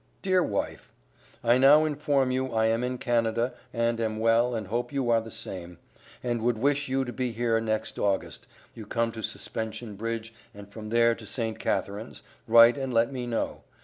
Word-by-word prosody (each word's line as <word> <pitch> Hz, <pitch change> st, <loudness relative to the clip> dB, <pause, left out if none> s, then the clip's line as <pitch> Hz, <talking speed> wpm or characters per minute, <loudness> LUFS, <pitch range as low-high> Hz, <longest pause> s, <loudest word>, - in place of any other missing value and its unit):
DEAR 185 Hz, -2 st, +3 dB
WIFE: 100 Hz, -, -3 dB, 0.5 s
I 120 Hz, +2 st, +4 dB
now 140 Hz, +3 st, +7 dB
infom 145 Hz, -3 st, +1 dB
you 130 Hz, +1 st, 0 dB
I 110 Hz, 0 st, +3 dB
am 115 Hz, +2 st, +1 dB
in 125 Hz, 0 st, -2 dB
Canada 115 Hz, 0 st, 0 dB, 0.2 s
and 115 Hz, 0 st, 0 dB
am 110 Hz, -1 st, -1 dB
well 115 Hz, +2 st, +3 dB
and 110 Hz, -2 st, -3 dB
hope 120 Hz, +5 st, -2 dB
you 135 Hz, -4 st, 0 dB
are 115 Hz, -1 st, +4 dB
the 115 Hz, -, -9 dB
same, 90 Hz, -6 st, -7 dB, 0.5 s
and 120 Hz, -2 st, -1 dB
would 120 Hz, 0 st, +1 dB
wish 140 Hz, +3 st, +1 dB
you 135 Hz, 0 st, 0 dB
to 125 Hz, -, -6 dB
be 125 Hz, -2 st, -2 dB
here 115 Hz, 0 st, 0 dB
next 110 Hz, -1 st, -2 dB
august, 100 Hz, -2 st, -1 dB, 0.3 s
you 110 Hz, -3 st, -10 dB
come 115 Hz, +1 st, 0 dB
to 110 Hz, -, -7 dB
suspension 110 Hz, -1 st, -5 dB
bridge 115 Hz, +1 st, -4 dB, 0.2 s
and 100 Hz, 0 st, -10 dB
from 105 Hz, +1 st, -9 dB
there 115 Hz, +1 st, +4 dB
to 115 Hz, -2 st, -10 dB
St. 115 Hz, -1 st, -3 dB
Catharines, 105 Hz, +4 st, -3 dB, 0.2 s
write 115 Hz, +3 st, +7 dB
and 135 Hz, -1 st, -3 dB
let 115 Hz, +1 st, +2 dB
me 125 Hz, -2 st, -4 dB
know. 115 Hz, -1 st, -2 dB
115 Hz, 190 wpm, -27 LUFS, 110-125 Hz, 0.5 s, now